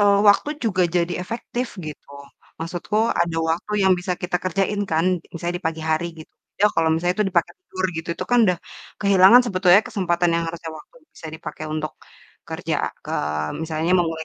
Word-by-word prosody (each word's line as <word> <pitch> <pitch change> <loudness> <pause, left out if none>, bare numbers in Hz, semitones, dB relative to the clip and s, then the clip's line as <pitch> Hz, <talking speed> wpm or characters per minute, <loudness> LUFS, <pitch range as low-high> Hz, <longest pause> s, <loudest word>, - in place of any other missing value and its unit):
eee, 200 -1 +5
waktu 205 +8 +4
juga 190 -5 +2
jadi 175 0 +1
efektif 240 +5 -4 0.2
gitu. 150 -2 -9 0.5
Maksudku 175 +5 -3 0.3
ada 170 -1 -3
waktu 170 +6 -2
yang 190 - +6
bisa 180 +1 -2
kita 180 0 0
kerjain 195 +3 0
kan, 160 +1 +2 0.3
misalnya 175 +1 -3
di - - -33
pagi 160 -1 -6
hari 160 +2 +1
gitu. 155 - -14 0.3
Ya 210 - +7
kalau 165 0 +2
misalnya 175 +2 0
itu 210 - +3
dipakai 170 -2 +1
tidur 185 - -5
gitu, 160 +1 -5
itu - - -4
kan 245 - +5
udah 180 -2 +1 0.4
kehilangan 200 +3 +7
sebetulnya 185 -2 +5
kesempatan 175 -6 +1
yang 170 - 0
harusnya 165 0 -6
waktu - - -17 0.2
bisa - - -10
dipakai 155 0 -7
untuk 155 -2 -3 0.6
kerja - - -3 0.3
ke - - -6 0.5
misalnya 160 +2 -1
memulai 165 -2 -1
175 Hz, 175 wpm, -22 LUFS, 165-195 Hz, 0.6 s, Ya